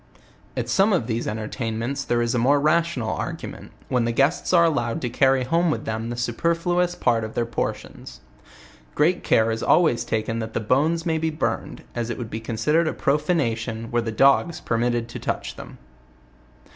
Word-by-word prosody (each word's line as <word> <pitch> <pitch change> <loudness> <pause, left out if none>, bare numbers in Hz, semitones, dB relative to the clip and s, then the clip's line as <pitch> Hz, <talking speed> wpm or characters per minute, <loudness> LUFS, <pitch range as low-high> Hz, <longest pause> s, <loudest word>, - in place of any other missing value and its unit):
At - - -1
some 200 +2 +3
of 150 -11 +1
these 115 0 -2
entertainments 115 +4 -3
there 120 -2 +1
is 120 +1 -1
a 120 - +1
more 140 +5 +4
rational 155 -6 +1
arrangement, - - -7 0.2
when 125 -2 +1
the 120 - 0
guests 140 +7 +1
arc 170 -2 +6
allowed 120 -3 -1
to 125 - -2
carry 135 0 +3
home 165 +6 +1
with 155 - -2
them 110 +1 -3
the 120 - -4
superfluous 170 +8 0
part 115 -7 +1
of 110 0 -6
their 120 - +1
portions. 60 - -5 0.8
Great 160 +5 +2
care 110 0 +3
is 115 - -3
always 155 -9 +3
taken 115 +1 -2
that 110 0 -6
the - - +1
bones 150 - +1
may 160 -2 +1
be 160 0 0
burned, 155 - -3
as 120 -1 -3
it 120 - -3
would 115 -3 -6
be 110 - -3
considered 120 +9 +1
a - - -1
profanation 120 -7 -1
were 120 0 +1
the 115 -1 -3
dogs 140 +8 +3
permitted 120 0 0
to 120 - -7
touch - - -3
them. - - -10
120 Hz, 185 wpm, -23 LUFS, 115-160 Hz, 0.8 s, arc